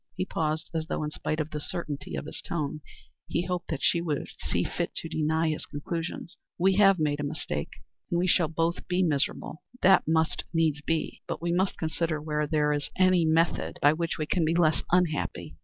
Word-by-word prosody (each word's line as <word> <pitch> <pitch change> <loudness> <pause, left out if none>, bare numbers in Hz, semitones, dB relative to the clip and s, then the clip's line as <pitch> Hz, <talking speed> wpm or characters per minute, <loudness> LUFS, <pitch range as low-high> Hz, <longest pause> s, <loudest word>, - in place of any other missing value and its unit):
He 185 - -1
paused 155 -2 -2
as 160 -1 -2
though - - -2
in 150 - -3
spite 155 0 -3
of 155 0 -2
the 150 - -3
certainty 150 -2 -4
of - - -4
his 155 - -6
tone, 155 -2 -3 0.5
he 170 +2 -1
hoped 180 -1 -3
that 155 -4 -3
she 170 - +3
would 155 -4 -2
see - - 0
fit - - -3
to - - -3
deny 160 0 +1
his 155 - -3
conclusions. 165 +3 -5 0.2
"We 190 +2 +3
have 195 -2 +6
made 150 -2 0
a - - -2
mistake 145 - -3 0.4
and 170 - +1
we 175 - +2
shall 175 -2 +3
both 165 +2 -1
be 180 +1 +2
miserable 155 -1 -1 0.2
that 190 -3 +6
must 160 0 +1
needs 155 -3 +2
be 160 +2 -2
but - - -3
we 170 +1 -1
must 185 +2 +1
consider 160 -1 -1
whether 150 0 -1
there 150 -1 +2
is 145 -1 -2
any 185 -2 +4
method 165 +2 +1
by 145 +1 +5
which 165 +1 -2
we 155 - -1
can 170 +3 +1
be 160 +1 +2
less 160 -2 +3
unhappy. 150 - 0
160 Hz, 205 wpm, -28 LUFS, 150-170 Hz, 0.5 s, have